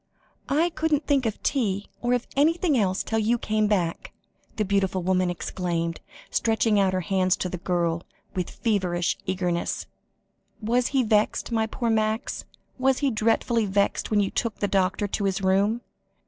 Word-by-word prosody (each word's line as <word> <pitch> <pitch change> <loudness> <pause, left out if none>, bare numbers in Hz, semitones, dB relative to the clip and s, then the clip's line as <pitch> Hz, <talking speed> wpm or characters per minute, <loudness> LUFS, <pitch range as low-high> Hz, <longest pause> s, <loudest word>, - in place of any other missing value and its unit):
"I 325 +5 +2
couldn't 310 -2 0
think 275 -5 +2
of 215 - -5
tea, 205 -7 0
or 245 +1 +1
of 245 -1 0
anything 320 +2 +3
else 190 -5 +1
till 225 - -1
you 225 +3 +2
came 215 -1 0
back," 180 -5 -1 0.4
the 215 - 0
beautiful 190 -2 0
woman 185 0 +2
exclaimed, 170 -1 -3 0.3
stretching 220 -2 +2
out 190 -1 +2
her 185 - 0
hands 185 0 +1
to 185 - -2
the 180 - -5
girl, 170 -2 0 0.3
with 180 -2 -2
feverish 185 -6 0
eagerness. 180 -2 -1 0.7
"Was 240 +3 +1
he 270 -2 +2
vexed 215 +1 +1
my 220 -1 +1
poor 235 +1 -1
Max 220 +2 -1 0.3
was 265 0 +3
he 270 - +3
dreadfully 225 0 +1
vexed 200 +1 0
when 215 - +3
you 195 - -1
took 230 -3 -1
the 205 - -1
doctor 195 +1 +1
to 200 +1 -2
his 195 0 -1
room?" 200 +5 +2
210 Hz, 165 wpm, -25 LUFS, 185-235 Hz, 0.7 s, anything